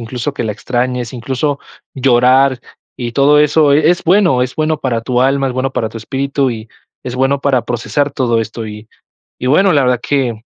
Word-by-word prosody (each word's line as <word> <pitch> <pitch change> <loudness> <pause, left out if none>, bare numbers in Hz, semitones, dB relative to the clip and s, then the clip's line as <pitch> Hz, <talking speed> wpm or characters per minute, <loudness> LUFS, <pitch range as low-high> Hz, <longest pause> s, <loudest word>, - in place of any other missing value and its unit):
incluso 125 +4 -4
que 120 - -3
la 105 - -2
extrañes, 125 +1 -3
incluso 135 +4 -2 0.4
llorar 130 0 +3 0.4
y 120 -1 -5
todo 145 +3 +4
eso, 150 0 +3
eh, 150 +2 +3
es 175 - -1
bueno, 170 -8 +3
es 125 - -3
bueno 155 0 0
para 120 -4 -1
tu 125 +2 0
alma, 135 +1 +1
es 125 - -3
bueno 130 +1 -2
para 110 - -2
tu 115 - -11
espíritu 135 +3 -2
y 110 -1 -7 0.3
es 125 -1 -6
bueno 135 +2 +1
para 130 -5 +1
procesar 140 +5 -1
todo 120 -4 0
esto. 115 0 -4
Y 105 +1 -9 0.6
bueno, 185 +7 +4
la 145 - +3
verdad 125 -2 +1
que, 125 -6 -1
130 Hz, 195 wpm, -15 LUFS, 120-140 Hz, 0.6 s, todo